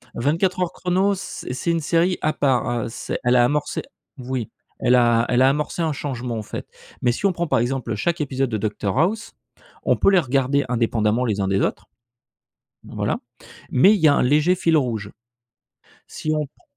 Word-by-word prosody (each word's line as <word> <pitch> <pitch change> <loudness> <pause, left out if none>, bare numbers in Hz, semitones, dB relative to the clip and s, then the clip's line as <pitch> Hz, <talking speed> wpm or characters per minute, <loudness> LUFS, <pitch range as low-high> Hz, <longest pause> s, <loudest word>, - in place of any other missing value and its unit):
24 165 +9 0
Heures 180 - 0
chrono, 190 +2 +1
c 185 - -7
c'est 170 +6 -1
une 165 - +1
série 170 +4 +1
à 155 - +1
part. 135 -3 +1 0.2
Heu, - - -4
c'est - - -5
elle 125 +1 +3
a 120 - +6
amorcé 145 +3 -1 0.4
oui, 125 -3 -4 0.3
elle 125 - +2
a 120 -1 +4
elle 125 +1 +2
a 130 - +6
amorcé 150 +4 -2
un 160 -2 +1
changement, 125 -5 -4
en 110 - -4
fait. - - -7 0.3
Mais 120 - +3
si 120 - -3
on 195 - +4
prend, 175 0 -2
par 130 -5 +2
exemple, 125 +2 -2
heu, - - 0
chaque 170 -2 -1
épisode 135 -2 -1
de 110 - -1
Docteur 105 0 -2
House, 210 +7 0 0.5
on - - +3
peut - - +3
les 190 - +5
regarder 135 -1 +1
indépendamment 115 -1 +1
les 105 -4 -1
uns 95 - 0
des 95 0 +1
autres. - - -2 1.0
Bah, - - -12
voilà, - - -1 0.5
mais 185 +11 +6
il 205 - -1
y 155 - +6
un 145 - +3
léger 150 +7 +3
fil 165 -3 +2
rouge. 115 -8 -1 1.0
Si 155 - -4
on 150 -1 -1
pr - - -32
135 Hz, 205 wpm, -22 LUFS, 120-165 Hz, 1.0 s, a